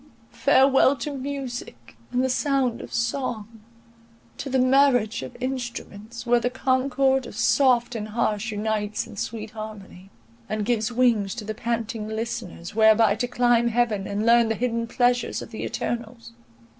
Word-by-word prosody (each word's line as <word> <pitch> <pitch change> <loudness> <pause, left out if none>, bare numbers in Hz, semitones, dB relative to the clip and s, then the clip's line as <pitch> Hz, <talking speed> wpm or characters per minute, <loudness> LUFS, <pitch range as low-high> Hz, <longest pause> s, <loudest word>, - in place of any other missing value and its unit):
Farewell 270 +1 +4
to 275 +3 -5
music, 260 - -6 0.2
and 250 +1 +1
the - - +2
sound 260 -2 0
of - - -10
song; 230 -2 -3 0.8
to 275 - -4
the 265 - +1
marriage 255 -4 +3
of 245 - -8
instruments, 240 -3 -5
where 240 0 +4
the 240 +1 0
concord 265 +1 +1
of - - -10
soft 250 -3 +3
and 215 -2 -4
harsh 215 0 -1
unites 210 0 -2
in 225 -2 -12
sweet 215 +1 -5
harmony, 210 -4 -9 0.4
and 215 -1 -2
gives 230 0 0
wings 230 -6 +2
to 225 -3 -6
the 215 - -3
panting 230 -1 -3
listeners, 220 -6 -5
whereby 220 -1 +5
to 235 +4 -2
climb 240 -1 +2
heaven, 225 -4 0
and 205 +2 -2
learn 235 -1 +5
the 225 - 0
hidden 230 0 -1
pleasures 245 0 +1
of - - -12
the 220 - -6
eternals! 235 - -4
235 Hz, 155 wpm, -24 LUFS, 215-250 Hz, 0.8 s, whereby